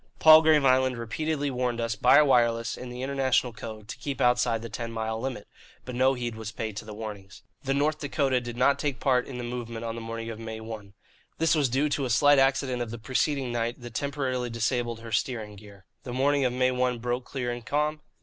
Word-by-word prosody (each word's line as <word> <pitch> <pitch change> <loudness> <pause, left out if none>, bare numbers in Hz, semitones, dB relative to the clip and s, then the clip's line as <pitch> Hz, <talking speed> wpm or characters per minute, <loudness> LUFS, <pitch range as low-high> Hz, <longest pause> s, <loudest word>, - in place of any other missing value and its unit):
Palgrave 155 -2 +7
Island 130 -1 +3
repeatedly 145 +5 -2
warned 125 -2 -1
us, 115 -1 -1
by - - +6
wireless, 120 -4 +2
in 125 - -8
the 125 +1 -6
international 130 -3 +1
code, 110 -1 -9
to - - -7
keep 140 -2 -4
outside 125 -2 +2
the - - -4
ten 115 +1 -5
mile 110 0 -3
limit; 130 -5 -5 0.4
but 125 - -6
no 130 +2 +3
heed 120 -2 -3
was 110 -1 -6
paid 110 -1 -5
to - - -6
the 105 - -8
warnings. 105 -3 -8 0.2
"The 135 0 0
North 155 +2 +1
Dakota 135 -3 0
did 120 -1 -7
not 135 +3 +3
take 140 -6 -2
part 125 -2 +2
in 130 - -7
the 120 - -5
movement 120 -1 -5
of 115 - -3
the 115 - -6
morning 115 0 -5
of 110 - -8
May 110 -1 -6
1. 110 -3 -9 0.4
This 165 0 +3
was 145 -5 +2
due 135 +5 +1
to 140 -1 -1
a - - -3
slight 145 +4 +5
accident 135 -2 +1
of 120 - -3
the 120 - -6
preceding 130 +2 -1
night 120 +1 -2
that 120 -2 -9
temporarily 130 -2 -2
disabled 115 0 -1
her 115 0 -9
steering 110 -1 -2
gear. 100 -1 -15 0.2
The 125 - -7
morning 140 +2 +2
of 125 - +1
May 130 0 +2
1 125 -1 0
broke 120 +2 -3
clear 125 -3 -3
and 120 0 -6
calm. 150 +4 -1
125 Hz, 225 wpm, -27 LUFS, 115-135 Hz, 0.4 s, Palgrave